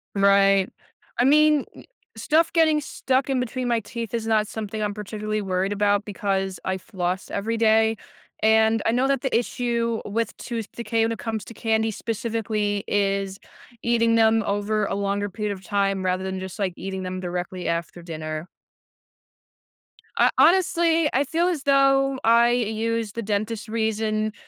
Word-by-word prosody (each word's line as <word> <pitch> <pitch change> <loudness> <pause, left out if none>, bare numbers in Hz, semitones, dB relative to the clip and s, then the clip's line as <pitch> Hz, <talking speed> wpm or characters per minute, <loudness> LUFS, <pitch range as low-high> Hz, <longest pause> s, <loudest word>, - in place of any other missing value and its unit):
Right. 195 -1 +4 0.5
I - - +5
mean, 300 +1 +4 0.5
stuff 320 +1 +2
getting 315 -3 +3
stuck 265 -1 -1
in 265 -1 +1
between 250 +1 -3
my 235 -1 +2
teeth 230 0 -6
is 230 -1 -2
not 215 -1 +2
something 215 0 -5
I'm 210 -1 -1
particularly 215 +1 -4
worried 190 0 -1
about 205 0 +1
because 195 -3 -2
I 190 0 -1
floss 185 0 -4
every 225 +3 -2
day 220 0 +3 0.5
and 220 0 +4
I - - +3
know 250 +3 +2
that 275 -2 +1
the 265 - -1
issue 235 -1 0
with 225 +1 -2
tooth 230 -4 -5
decay 230 -1 -1
when 225 - +1
it 225 - -3
comes 220 -3 -3
to - - -10
candy 220 0 0
specifically 215 -2 -2
is 195 -1 0 0.4
eating 230 -1 +2
them 225 0 +4
over 205 +1 0
a - - -3
longer 200 0 -1
period 210 +1 -3
of 190 -1 -11
time 195 -1 0
rather 185 0 0
than 190 0 -3
just, 190 +2 -7
like, 190 -3 -1
eating 190 0 -5
them 185 0 -4
directly 180 0 -4
after 170 +1 -3
dinner. 155 -1 -5 1.7
Ho - - +4
honestly, 335 -3 +4
I 270 - +3
feel 330 +5 0
as 335 -6 -1
though 275 -1 +3
I 235 +1 +5
use 230 -1 -1
the 230 - -4
dentist's 215 +1 -3
reason 215 -1 -1
220 Hz, 160 wpm, -24 LUFS, 200-235 Hz, 1.7 s, I